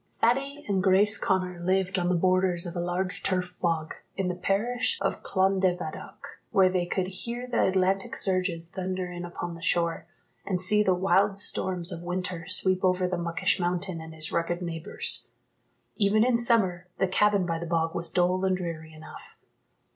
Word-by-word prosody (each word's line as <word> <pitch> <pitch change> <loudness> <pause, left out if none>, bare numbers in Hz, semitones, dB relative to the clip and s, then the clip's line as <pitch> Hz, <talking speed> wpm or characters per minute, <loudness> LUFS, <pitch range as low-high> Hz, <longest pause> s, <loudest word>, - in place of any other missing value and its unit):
Thady 275 +5 +1
and 195 -2 +1
Grace 200 +3 +4
Connor 185 -2 0
lived 185 +1 0
on 175 0 0
the 180 - +2
borders 185 0 +2
of 175 0 -6
a - - -2
large 180 +2 -2
turf 180 -1 -1
bog, 165 -3 0 0.2
in 190 -2 0
the - - -1
parish 225 +7 0
of 195 - -1
Clondevaddock, 190 -4 -1
where 190 -1 +4
they 180 -1 0
could 185 +1 -1
hear 235 +6 -5
the 250 - +1
Atlantic 190 +1 +1
surges 185 -3 0
thunder 185 0 -4
in 175 0 -6
upon 175 0 -5
the 170 - -10
shore, 170 -1 0 0.4
and 185 -3 -1
see 210 +3 +4
the 190 -3 +3
wild 195 +2 +2
storms 185 -3 -1
of 170 -2 -5
winter 180 -1 -4
sweep 185 -1 0
over 185 0 +2
the 180 - -1
Muckish 175 +2 0
mountain, 175 -1 -1
and 160 0 -10
his 155 0 -4
rugged 170 +1 -1
neighbours. 165 -2 0 0.7
Even 215 +1 +3
in 250 0 +3
summer 205 -7 +3
the 190 - +2
cabin 200 0 +2
by 165 -1 -2
the 170 - -5
bog 165 -1 0
was 170 0 -3
dull 180 +1 +1
and 190 -1 +2
dreary 165 -3 -6
enough. 155 0 -13
185 Hz, 175 wpm, -27 LUFS, 175-195 Hz, 0.7 s, Grace